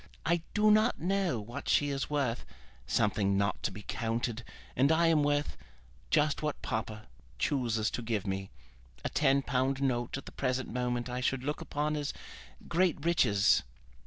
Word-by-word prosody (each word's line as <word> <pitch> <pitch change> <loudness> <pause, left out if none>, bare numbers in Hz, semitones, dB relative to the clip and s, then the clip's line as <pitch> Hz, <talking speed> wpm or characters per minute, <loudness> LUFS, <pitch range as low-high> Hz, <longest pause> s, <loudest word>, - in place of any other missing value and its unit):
I 170 +1 +2
do 215 0 +5
not 215 +3 +4
know 180 - 0
what 110 +4 -6
she 145 - +3
is 135 -1 -2
worth, 135 -5 -1 0.4
something 100 - +2
not 100 -1 0
to - - 0
be 105 +2 -9
counted; 115 +2 -2 0.3
and 135 +4 +4
I 165 +1 +4
am 165 -2 +4
worth, 145 0 0 0.5
just 150 - +2
what 150 -1 -2
papa 110 -1 -3 0.3
chooses 115 - 0
to - - -3
give 110 -3 -2
me. 95 0 -3 0.6
A - - +1
ten 140 -2 +3
pound 130 +1 0
note 125 -2 0
at 135 - -8
the - - -9
present 130 -2 -2
moment 125 -1 -1
I 125 0 -3
should 130 0 0
look 150 +2 -2
upon 150 +1 -1
as 145 -1 -2 0.5
great 170 -3 +1
riches." 110 -13 +4
130 Hz, 165 wpm, -31 LUFS, 115-150 Hz, 0.6 s, do